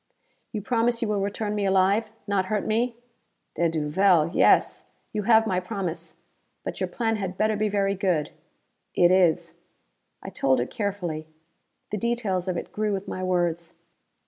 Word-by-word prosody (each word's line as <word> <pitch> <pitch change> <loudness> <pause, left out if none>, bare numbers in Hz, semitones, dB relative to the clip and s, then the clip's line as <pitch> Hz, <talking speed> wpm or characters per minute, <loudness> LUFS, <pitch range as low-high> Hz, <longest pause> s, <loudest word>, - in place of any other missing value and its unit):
"You 215 -4 -4
promise 235 +1 +1
you - - 0
will 210 -2 0
return 205 +1 -2
me 205 -1 -1
alive? 195 +3 +3 0.2
Not 200 -2 0
hurt 210 0 -1
me?" 235 +2 0 0.6
"De 170 -1 +1
duvel 165 +2 +3
yes! - - +3 0.3
You 210 - -1
have 225 -1 +6
my 185 -4 0
promise. 175 -4 -5 0.5
But - - -5
your - - 0
plan 225 -2 -1
had 190 -2 -4
better 215 0 +2
be 210 0 0
very 200 -1 +1
good." 180 -6 0 0.6
"It 175 0 +5
is." 180 -3 +3 0.7
I - - -6
told 130 -2 +1
it 120 - -2
carefully. 180 -7 -3 0.6
The 210 - -1
details 210 -5 -1
of 180 -2 -1
it - - -6
grew 215 -1 -1
with 195 0 -4
my 185 - -4
words. 175 -2 -1
195 Hz, 165 wpm, -25 LUFS, 175-215 Hz, 0.7 s, have